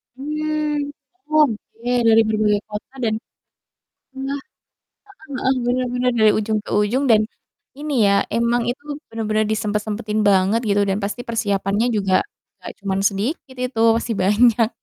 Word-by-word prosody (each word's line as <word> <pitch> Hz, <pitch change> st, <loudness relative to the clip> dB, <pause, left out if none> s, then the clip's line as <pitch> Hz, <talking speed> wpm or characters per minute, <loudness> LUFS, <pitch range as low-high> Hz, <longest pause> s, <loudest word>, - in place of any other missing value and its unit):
Mmm, 300 Hz, 0 st, -2 dB, 0.4 s
oke 245 Hz, -5 st, 0 dB, 0.2 s
dari 225 Hz, 0 st, +6 dB
berbagai 215 Hz, -1 st, +1 dB
kota 210 Hz, +5 st, -7 dB
dan 220 Hz, -, +1 dB, 1.0 s
engah 275 Hz, +1 st, -3 dB, 0.7 s
heeh 350 Hz, -6 st, -18 dB
heeh, 260 Hz, +1 st, +1 dB
benar-benar 250 Hz, 0 st, 0 dB
dari 215 Hz, -1 st, +6 dB
ujung 215 Hz, 0 st, 0 dB
ke -, -, -9 dB
ujung 210 Hz, +7 st, +1 dB
dan 215 Hz, -1 st, +6 dB, 0.6 s
ini 300 Hz, 0 st, -3 dB
ya, 200 Hz, -, +4 dB, 0.2 s
emang 235 Hz, +1 st, +1 dB
itu 245 Hz, +4 st, -3 dB, 0.3 s
benar-benar 215 Hz, -1 st, 0 dB
disempat-sempatin 215 Hz, 0 st, -2 dB
banget 195 Hz, +3 st, +3 dB
gitu 205 Hz, -1 st, +2 dB
dan 195 Hz, +1 st, 0 dB
pasti 210 Hz, +4 st, -4 dB
persiapannya 205 Hz, -1 st, 0 dB
juga 195 Hz, -2 st, +1 dB, 0.5 s
gak -, -, -7 dB
cuman 195 Hz, -1 st, -1 dB
sedikit 245 Hz, -, -2 dB
itu, 250 Hz, -3 st, -3 dB, 0.2 s
pasti 230 Hz, 0 st, -2 dB
banyak. 220 Hz, +3 st, +4 dB
225 Hz, 135 wpm, -21 LUFS, 210-255 Hz, 1.0 s, dari